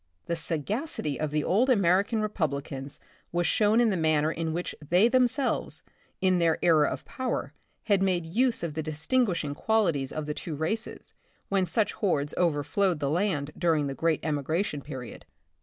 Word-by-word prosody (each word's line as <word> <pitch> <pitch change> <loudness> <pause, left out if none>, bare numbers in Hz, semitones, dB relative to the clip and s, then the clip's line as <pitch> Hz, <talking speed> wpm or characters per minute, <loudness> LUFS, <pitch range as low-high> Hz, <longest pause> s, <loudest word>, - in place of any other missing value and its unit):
The 170 - -1
sagacity 165 - -2
of 155 - -1
the 150 0 0
old 230 +9 +2
American 200 0 +3
Republicans 140 -8 -3 0.3
was 175 0 0
shown 215 +5 +3
in 235 -2 +4
the - - 0
manner 155 -2 +2
in 165 0 -2
which 175 +2 -3 0.2
they 180 +6 +5
themselves, 255 +1 +1 0.4
in 185 -1 +3
their 165 -1 +3
era 155 -4 +5
of - - -4
power, 260 -1 -3 0.3
had 200 -3 +2
made 180 -3 +1
use 230 +6 +1
of 165 -3 -2
the 160 - -2
distinguish 165 +7 0
ing 145 -1 -3
qualities 170 -8 +1
of 155 -1 -4
the 150 - -2
two 155 +1 -5
races, 215 +10 -3 0.4
when 195 -2 +1
such 220 +1 0
hordes 145 -8 0
overflowed 170 +2 +1
.the 140 -1 -1
land 160 -5 0
during 160 -4 +1
the 135 - -3
great 160 +2 0
emigration 150 +1 -1
period. 130 -4 -8
170 Hz, 170 wpm, -28 LUFS, 150-205 Hz, 0.4 s, they